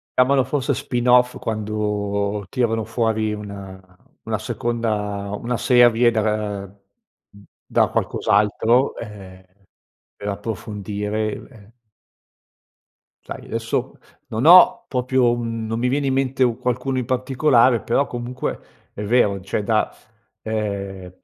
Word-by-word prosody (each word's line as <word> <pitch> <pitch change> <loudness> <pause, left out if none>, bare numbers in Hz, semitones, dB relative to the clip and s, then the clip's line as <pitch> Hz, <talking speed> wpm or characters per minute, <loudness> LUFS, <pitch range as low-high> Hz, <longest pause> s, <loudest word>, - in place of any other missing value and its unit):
Chiamalo 130 +1 +4
forse 135 +1 -1
spin 125 -2 -2
off 125 0 +4
quando 105 -1 -2
tirano 115 -3 0
fuori 110 -1 0
una 100 -2 -8 0.4
una - - -2
seconda 105 -4 -3
una 120 +3 -3
serie 120 -1 +4
da 110 -1 0
ra 105 0 +1 0.3
mhmm, 100 - -24 0.2
da - - +2
qualcos'altro, 110 +5 +1
ehm, 95 -4 -10 0.7
per 100 - -8
approfondire 105 0 -3
u - - -13
ehm 110 -4 -17 1.5
Sai, - - -8
adesso - - -3 0.3
non 110 +5 -2
ho 230 +7 +8
proprio 125 -1 +1
un 115 -2 -3
non 115 +1 -2
mi 125 +2 0
viene 140 +2 0
in 135 - +1
mente 135 0 +1
u 120 -2 +1
qualcuno 125 +1 -2
in 125 - -1
particolare, 130 -1 +3
però 135 +4 +1
comunque 120 +1 -4 0.3
è 105 - -6
vero, 105 -2 +2
d 95 - -11
cioè, 100 - -1
da, 110 +1 0 0.5
ehm, 100 -4 -4
115 Hz, 125 wpm, -21 LUFS, 105-125 Hz, 1.5 s, ho